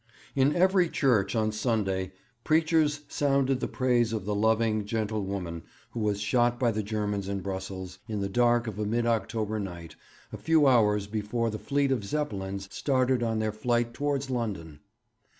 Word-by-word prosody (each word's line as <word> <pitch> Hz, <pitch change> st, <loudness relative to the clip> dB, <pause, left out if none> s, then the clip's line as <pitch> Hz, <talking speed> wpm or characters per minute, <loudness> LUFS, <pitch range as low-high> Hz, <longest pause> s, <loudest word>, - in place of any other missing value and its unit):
In 140 Hz, +2 st, +3 dB
every 185 Hz, -1 st, +4 dB
church 115 Hz, -10 st, +2 dB
on 110 Hz, -1 st, +1 dB
Sunday 105 Hz, -4 st, -1 dB, 0.3 s
preachers 155 Hz, -2 st, +2 dB
sounded 135 Hz, -2 st, +1 dB
the -, -, -2 dB
praise 120 Hz, -3 st, +1 dB
of 105 Hz, -4 st, -3 dB
the 105 Hz, -, -1 dB
loving, 110 Hz, 0 st, +2 dB
gentle 110 Hz, 0 st, -2 dB
woman 90 Hz, -4 st, -4 dB, 0.3 s
who 120 Hz, -, -5 dB
was 105 Hz, -2 st, 0 dB
shot 120 Hz, +3 st, +1 dB
by 120 Hz, -3 st, +2 dB
the 110 Hz, 0 st, -1 dB
Germans 105 Hz, -2 st, -2 dB
in 100 Hz, -1 st, -2 dB
Brussels 95 Hz, -1 st, -6 dB
in 110 Hz, -3 st, -3 dB
the 100 Hz, -, -1 dB
dark 120 Hz, +3 st, +2 dB
of 110 Hz, -3 st, -5 dB
a 105 Hz, -, -1 dB
mid 115 Hz, +2 st, 0 dB
October 110 Hz, -1 st, -1 dB
night 85 Hz, -4 st, -7 dB, 0.4 s
a -, -, -4 dB
few 160 Hz, -2 st, +3 dB
hours 105 Hz, -6 st, +4 dB
before 110 Hz, +2 st, -2 dB
the 110 Hz, -, -5 dB
fleet 140 Hz, -1 st, 0 dB
of 125 Hz, -6 st, 0 dB
Zeppelins 100 Hz, -7 st, -3 dB
started 130 Hz, -2 st, +1 dB
on 115 Hz, -1 st, 0 dB
their 110 Hz, 0 st, 0 dB
flight 120 Hz, +1 st, 0 dB
towards 140 Hz, 0 st, -2 dB
London. 95 Hz, -, -4 dB
110 Hz, 170 wpm, -28 LUFS, 100-125 Hz, 0.4 s, every